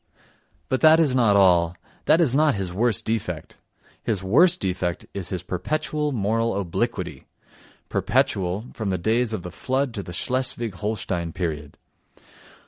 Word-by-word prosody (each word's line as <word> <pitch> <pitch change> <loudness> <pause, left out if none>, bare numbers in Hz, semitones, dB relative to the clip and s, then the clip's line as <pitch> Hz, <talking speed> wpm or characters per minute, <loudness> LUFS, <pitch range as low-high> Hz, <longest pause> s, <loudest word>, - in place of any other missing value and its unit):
But 130 - -1
that 160 0 +7
is 150 -6 +3
not 115 -5 +4
all, 90 -3 +4 0.3
that 160 - +5
is 155 -8 +3
not 150 -1 +3
his 95 -3 -4
worst 110 +1 +1
defect; 100 -8 -3 0.4
his 105 -5 -1
worst 170 - +4
defect 90 -2 -2
is 95 -3 -3
his 90 - -4
perpetual 150 - -2
moral 115 -2 0
obliquity, 90 -4 -3 0.6
perpetual—from 100 +3 -1
the 95 - 0
days 115 +6 +1
of 105 -5 -4
the 90 - -7
Flood 130 +4 -1
to 105 - -3
the 90 - -9
Schleswig 120 +2 -1
Holstein 90 -4 -3
period. 75 -5 -4
105 Hz, 140 wpm, -24 LUFS, 90-125 Hz, 0.6 s, that